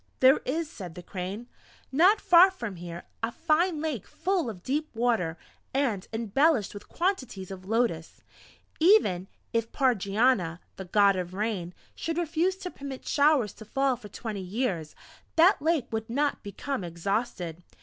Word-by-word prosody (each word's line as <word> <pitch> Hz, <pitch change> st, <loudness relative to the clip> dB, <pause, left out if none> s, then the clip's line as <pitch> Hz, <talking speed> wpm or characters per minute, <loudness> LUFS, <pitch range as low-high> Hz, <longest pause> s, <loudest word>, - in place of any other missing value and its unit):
"There 265 Hz, +2 st, +6 dB
is," 320 Hz, +5 st, -1 dB
said 185 Hz, -, -9 dB
the 180 Hz, -, -9 dB
Crane, 190 Hz, +6 st, -5 dB, 0.5 s
"not 365 Hz, +10 st, +5 dB
far 355 Hz, +2 st, +7 dB
from 230 Hz, -, -6 dB
here, 170 Hz, 0 st, -7 dB, 0.2 s
a 225 Hz, +1 st, -1 dB
fine 325 Hz, +2 st, +1 dB
Lake 300 Hz, -, -3 dB
full 370 Hz, -9 st, -1 dB
of 185 Hz, -5 st, -9 dB
deep 300 Hz, +4 st, -1 dB
water, 225 Hz, -9 st, +1 dB, 0.4 s
and 235 Hz, -9 st, 0 dB
embellished 230 Hz, +2 st, +2 dB
with 205 Hz, -, -10 dB
quantities 255 Hz, -, -2 dB
of 185 Hz, -1 st, -8 dB
lotus. 225 Hz, -8 st, -1 dB, 0.6 s
Even 315 Hz, -, +4 dB, 0.3 s
if 230 Hz, 0 st, 0 dB
Pardjania, 210 Hz, -6 st, +2 dB, 0.2 s
the 190 Hz, -, -6 dB
God 200 Hz, +1 st, +4 dB
of 180 Hz, 0 st, -4 dB
rain, 195 Hz, -4 st, -2 dB, 0.2 s
should 330 Hz, 0 st, -4 dB
refuse 345 Hz, +2 st, +1 dB
to 370 Hz, -1 st, -7 dB
permit 275 Hz, -2 st, -8 dB
showers 285 Hz, -7 st, +3 dB
to -, -, -12 dB
fall 270 Hz, +4 st, +1 dB
for 225 Hz, -4 st, -12 dB
twenty 210 Hz, -1 st, -5 dB
years, 185 Hz, -5 st, -2 dB, 0.4 s
that 335 Hz, +1 st, +5 dB
Lake 320 Hz, -4 st, +1 dB
would 220 Hz, 0 st, -3 dB
not 285 Hz, +4 st, 0 dB
become 205 Hz, +4 st, -4 dB
exhausted. 175 Hz, 0 st, -3 dB
230 Hz, 150 wpm, -28 LUFS, 190-300 Hz, 0.6 s, far